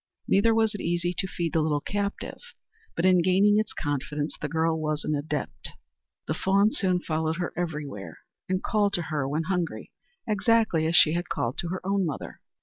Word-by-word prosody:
Neither 225 +3 +4
was 220 -1 +2
it 205 - -5
easy 175 +1 0
to 190 - 0
feed 170 -3 -3
the 160 - +3
little 150 -1 +1
captive; 200 +5 -3 0.6
but 170 - 0
in 185 -1 +5
gaining 195 +4 +4
its 215 -1 -1
confidence 145 0 -3
the 150 - -1
girl 160 +1 0
was 155 -1 -1
an 155 - -1
adept. 150 0 -4 0.5
The - - -1
fawn 200 +3 +3
soon 185 -9 +1
followed 160 0 -1
her 175 -1 -3
everywhere, 145 - -4 0.3
and 185 0 0
called 205 -3 +1
to 175 - +1
her 140 -3 0
when 155 +3 0
hungry 180 -1 -2 0.4
exactly 215 -6 +2
as 165 - +1
she 155 - +6
had 175 +1 -2
called 120 +2 -2
to 170 - -2
her 185 +1 -5
own 195 0 +1
mother. 155 -6 -5
175 Hz, 190 wpm, -27 LUFS, 155-195 Hz, 0.6 s, she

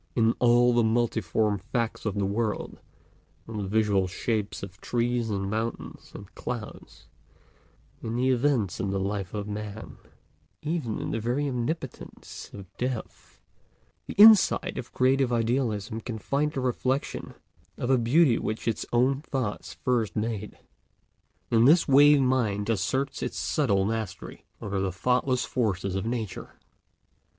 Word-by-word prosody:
In 115 -1 +3
all 120 0 +5
the 120 - +4
multiform 110 -3 +1
facts 110 +3 -3
of 105 - -2
the 100 -1 0
world—in 105 -3 -6
the 100 -2 -3
visual 100 -2 +2
shapes 105 +3 -3
of 95 -1 -9
trees 120 -1 -1
and 100 -2 -2
mountains 110 +3 -4
and 100 - -11
clouds, 120 -4 -7 1.0
in 115 0 -4
the 130 +2 +2
events 125 - +1
of 100 - -1
the 95 0 -1
life 100 0 -3
of 105 -1 -4
man, 105 0 -7 0.7
even 150 -8 -2
in - - -4
the - - -1
very 125 +6 -1
omnipotence 135 +5 -5
of 95 -3 -12
Death—the 125 -2 -8
insight 215 -2 +6
of 120 - -8
creative 130 0 +2
idealism 115 -2 -1
can 115 -1 -5
find 145 +8 -1
the 135 - -2
reflection 130 +2 -2 0.4
of 125 - -1
a 130 - +5
beauty 125 +2 +4
which 110 +2 -4
its 115 - -1
own 130 +3 +2
thoughts 130 -8 -4
first 120 -6 -1
made. 105 -1 -3 0.9
In 115 0 +5
this 165 +6 +5
way 145 +1 +7
mind 115 -6 +1
asserts 130 +8 -1
its - - -3
subtle 100 -10 +1
mastery 110 -2 -5 0.2
over 100 -1 -2
the 95 -1 -1
thoughtless 125 +6 +1
forces 100 -6 -1
of 95 +3 -2
Nature. 115 -5 -4
115 Hz, 140 wpm, -27 LUFS, 105-125 Hz, 1.0 s, way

